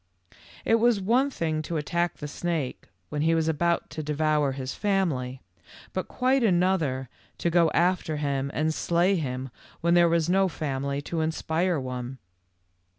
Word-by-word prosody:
It 225 0 +4
was 235 -2 +4
one 240 +8 +2
thing 160 - -2
to 160 +1 -3
attack 170 +3 -1
the 150 - -5
snake 155 -3 -3 0.2
when 150 - -2
he 165 +2 +3
was 160 -1 +1
about 170 +2 0
to 155 - -4
devour 150 -1 +1
his 130 -1 -4
family, 155 -11 -1 0.5
but - - -2
quite 260 +1 +1
another 175 - +2 0.3
to 170 - 0
go 170 -1 +4
after 175 -3 +1
him 140 -2 -1
and 155 +1 0
slay 175 +4 +2
him 130 -5 -3 0.3
when 170 +1 +3
there 175 -1 +5
was 165 -1 +2
no 190 +2 +3
family 140 -3 -3
to 165 +2 -2
inspire 160 +2 0
one. 125 0 -5
160 Hz, 155 wpm, -26 LUFS, 140-175 Hz, 0.5 s, there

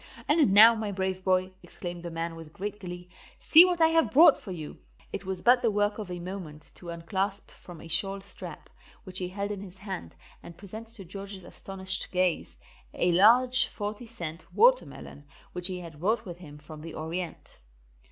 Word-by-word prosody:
"And 295 - +4
now, 220 +4 +9
my 220 -2 -3
brave 190 -1 -2
boy," 185 0 +1
exclaimed 175 -1 -8
the 170 - -6
man 165 0 -4
with 160 -1 -11
great 205 +1 -5
glee, 180 -2 -8 0.3
"see 330 +3 +8
what 355 -1 0
I 320 -1 +6
have 325 0 +3
brought 305 +1 +7
for - - -12
you." 155 -4 -7 0.3
It 185 - -5
was 190 -1 -3
but 245 +1 +5
the 230 - +2
work 205 0 0
of 205 -4 -6
a 180 - -4
moment 175 -4 -8
to 175 - -11
unclasp 190 +4 -3
from 175 -3 -13
a 165 - -11
shawl 195 +4 0
strap, - - -6 0.4
which 185 -2 -6
he 180 - -2
held 200 +2 -4
in 200 -2 -5
his 190 -2 -11
hand, 190 - -7 0.3
and 170 - -12
present 215 +3 -9
to 195 - -10
George's 195 +1 -8
astonished 190 +1 -3
gaze, 180 -2 0 0.4
a 175 - +2
large 240 +7 +5
40 210 +3 -6
cent 170 -8 -7
watermelon, 480 - +2 0.3
which 180 0 0
he 185 -2 -5
had 165 -4 -11
brought 220 +6 0
with 175 -2 -8
him 150 -5 -11
from 150 +1 -11
the 165 0 -8
Orient. 165 +2 -6
190 Hz, 190 wpm, -28 LUFS, 175-210 Hz, 0.4 s, now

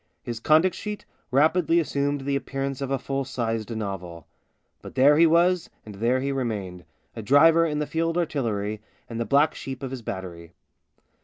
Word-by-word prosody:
His 120 -1 -5
conduct 160 +8 +4
sheet 210 -1 -6 0.2
rapidly 160 +5 +3
assumed 145 -3 -1
the 140 +1 -1
appearance 135 0 -3
of 135 - -3
a 135 - +1
full 135 +1 -3
sized 115 -4 -3
novel; 90 -6 -6 0.6
but - - -11
there 140 +3 +6
he 165 +2 +6
was 170 +2 +3 0.2
and 105 - -9
there 120 +6 0
he 140 +1 -1
remained 105 -9 -4 0.2
— - - -42
a 115 - -5
driver 160 +8 +5
in 150 -1 -2
the 150 - -1
Field 165 +2 -1
Artillery, 110 -10 -2 0.3
and 115 -1 -6
the 115 - -1
black 145 +4 +3
sheep 135 0 -7
of 130 - -4
his 130 -2 -6
battery. 85 -5 -7
135 Hz, 180 wpm, -25 LUFS, 115-155 Hz, 0.6 s, there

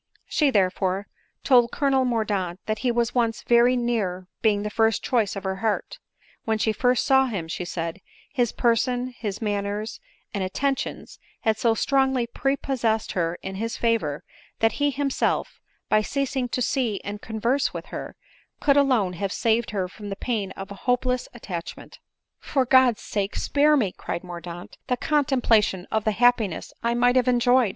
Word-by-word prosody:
She, 300 -3 +2
therefore, 190 -2 +1 0.4
tpld 245 -3 +5
Colonel 270 -1 +1
Mordaunt 205 -7 -1
that 215 -1 -2
he 255 - 0
was 235 0 0
once 230 -3 0
very 240 +1 +4
near 210 -7 -1 0.2
being 205 -2 +2
the 210 - -3
first 225 0 +2
choice 225 -6 +1
of 195 - -5
her 190 0 -2
heart; 220 +1 -2 0.4
when 220 -1 0
she 220 +1 +1
first 250 +1 +2
saw 265 0 +4
him, 195 -9 -4
she 175 +2 -4
said, 165 +2 -4 0.3
his 245 -3 +1
person, 245 +1 +1
and 210 -2 -3
manners, 205 +1 -2 0.3
and 200 - -1
attentions, 270 +9 -3 0.2
had 220 -1 +1
so 230 -2 +3
strongly 265 -1 +2
prepossessed 240 -3 -1
her 170 -1 -1
in 190 0 -5
his 225 +2 -3
favor, 220 -12 0 0.3
that 225 0 +3
he 290 - +4
himself, 280 -1 -1 0.3
by 215 - +3
ceasing 270 +1 -2
to 250 - -1
see 235 -5 0
and 205 +1 -6
converse 235 +5 0
with - - -6
her, - - -6 0.4
could 280 -1 +3
alone 250 -10 +3
have 195 +2 -3
saved 230 +2 +1
her 190 -3 -2
from 205 +2 -9
the 195 - -3
pain 215 -3 -2
of 195 +1 -8
a 200 +5 -7
hopeless 250 0 +1
attach 175 -7 -6
ment. - - -13 0.2
" - - -59
For 270 -3 +3
God's 255 -3 +5
sake, 200 -1 -2
spare 295 +1 +3
me," 210 -9 +1
cried 170 - -5
Mordaunt, 175 -1 -8
" - - -52
the 250 -2 0
contemplation 245 -11 +2
of 220 -1 0
the 215 - +2
happiness 225 -5 +2
I 235 0 0
might 245 +1 +3
have 255 0 +3
enjoyed 245 -1 +4
225 Hz, 175 wpm, -25 LUFS, 200-250 Hz, 0.4 s, tpld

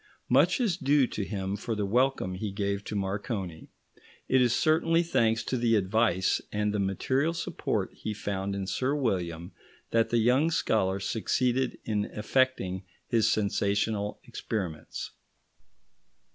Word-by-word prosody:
Much - - +4
is 210 -9 +1
due 140 -3 +3
to 105 - -4
him 95 -1 -3
for 110 +2 -3
the 105 -1 -1
welcome 125 -2 +1
he 100 +3 -3
gave 100 0 -2
to 105 - -5
Marconi; 95 -3 -3 0.6
it 130 0 +4
is 125 -2 +4
certainly 165 +4 +3
thanks 115 -9 +1
to 130 - -1
the 115 -1 +3
advice 100 -1 +2
and 105 0 0
the 105 - 0
material 130 - 0
support - - -2
he 110 - -5
found 100 -1 -3
in 100 -1 -3
Sir 130 +8 0
William 90 - -2 0.4
that 115 0 +2
the 120 - +2
young 125 +7 +3
scholar 100 - +1
succeeded 125 +4 0
in 105 -2 0
effecting 105 -5 0 0.3
his 115 -3 +3
sensational 105 0 0
experiments. 90 -8 -5
110 Hz, 140 wpm, -28 LUFS, 100-130 Hz, 0.6 s, Much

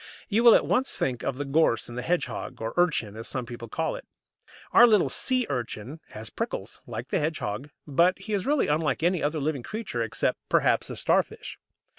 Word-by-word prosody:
You 225 +2 +2
will 235 -2 +9
at - - +3
once 265 +2 +1
think 125 -2 -1
of 130 - -2
the 145 - -3
gorse 135 -6 +2
and 120 - -9
the 125 - -3
hedgehog, 175 +7 -2
or 115 +1 -4
urchin, 150 - +1
as 115 +1 -6
some 125 -2 -3
people 120 0 -8
call 160 +7 -2
it. - - -10 0.6
Our 240 - +8
little 210 -5 +4
Sea 255 -2 +2
urchin 125 +2 -4
has 110 0 -8
prickles, - - -5
like - - -6
the - - +1
hedgehog, 145 -5 -3 0.2
but 170 +5 +3
he 215 - -6
is 200 +2 -1
really 290 -1 +3
unlike 155 +1 0
any 175 0 +2
other 155 +2 0
living 145 -2 -1
creature, 205 - -4
except, 115 - -1
perhaps, - - +2
the - - -5
Starfish. - - -1
150 Hz, 200 wpm, -27 LUFS, 120-180 Hz, 0.6 s, will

